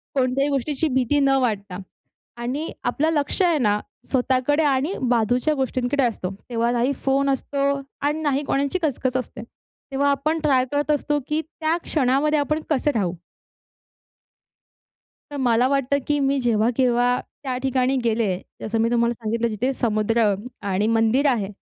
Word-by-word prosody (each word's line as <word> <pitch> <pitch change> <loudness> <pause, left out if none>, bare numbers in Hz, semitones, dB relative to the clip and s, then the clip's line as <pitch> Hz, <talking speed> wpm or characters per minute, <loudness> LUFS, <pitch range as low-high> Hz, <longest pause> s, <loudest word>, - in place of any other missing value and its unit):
कोणत्याही 265 +2 +1
गोष्टीची 285 +2 -1
भीती 260 +2 +1
न 275 -1 +3
वाटता. 205 -6 -2 0.6
आणि 255 +7 -3
आपलं 310 +2 +1
लक्ष 295 +5 0
आहे 345 -3 +3
ना, 210 -4 +2 0.3
स्वतःकडे 260 +3 +1
आणि 285 +4 +1 0.2
बाजूच्या 245 +5 +2
गोष्टींकडे 265 0 0
असतो. 225 -6 -1 0.2
तेव्हा 235 0 0
नाही 245 +2 +1
फोन 275 +1 +2
असतो 275 +1 -2 0.5
अन् 300 +2 -1
नाही 285 -1 +1
कोणाची 280 +7 0
कचकच 260 -3 0
असते. 245 -3 -6 0.5
तेव्हा 280 +1 +1
आपण 305 +3 0
ट्राय 270 -5 +2
करत 290 +1 0
असतो 295 0 0
की 305 +1 0
त्या 320 +1 -2
क्षणामध्ये 295 +2 +2
आपण 305 +2 0
कसे 295 -1 +1
राहू. 185 -6 0 2.2
तर 290 - -6
मला 245 -2 +3
वाटतं, 275 0 +1
की 295 0 +1
मी 275 0 +1
जेव्हा 230 -2 +2
-केव्हा 245 -1 +2 0.2
त्या 260 -3 -2
ठिकाणी 265 0 +1
गेले. 220 -5 +1 0.2
जसं 225 +1 -2
मी 230 +1 +2
तुम्हाला 235 0 +2
सांगितलं 230 +1 -1
जिथे 230 +5 -1
समुद्र 215 -2 +1 0.4
आणि 200 +3 +1
मंदिर 225 +5 +2
आहे. 225 -7 0
260 Hz, 150 wpm, -23 LUFS, 235-285 Hz, 2.2 s, न